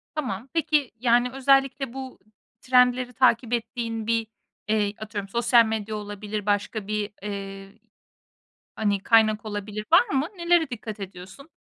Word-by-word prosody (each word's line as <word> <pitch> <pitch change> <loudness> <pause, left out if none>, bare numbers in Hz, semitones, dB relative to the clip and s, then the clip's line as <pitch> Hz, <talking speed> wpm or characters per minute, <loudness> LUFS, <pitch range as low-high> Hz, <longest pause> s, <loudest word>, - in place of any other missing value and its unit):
Tamam. 250 -6 -3
Peki, 300 -4 +1
yani, 245 +1 +3
özellikle 270 -1 +2
bu 265 -1 -8 0.4
trendleri 250 -1 +3
takip 245 -1 +3
ettiğin 230 -1 -3
bir, 230 -1 +1 0.4
eee, 210 -1 +1
atıyorum 205 -2 -6
sosyal 235 +1 +4
medya 220 -1 -3
olabilir, 205 0 -5
başka 205 0 -1
bir, 210 -1 -2
eee, 195 -1 -7 1.0
hani, 200 -2 0
kaynak 220 -2 +4
olabilir. 210 0 -5
Var 360 +9 +6
mı? 275 -5 0
Nelere 340 -2 +2
dikkat 220 -3 -7
ediyorsun? 190 - -10
225 Hz, 130 wpm, -25 LUFS, 210-255 Hz, 1.0 s, Var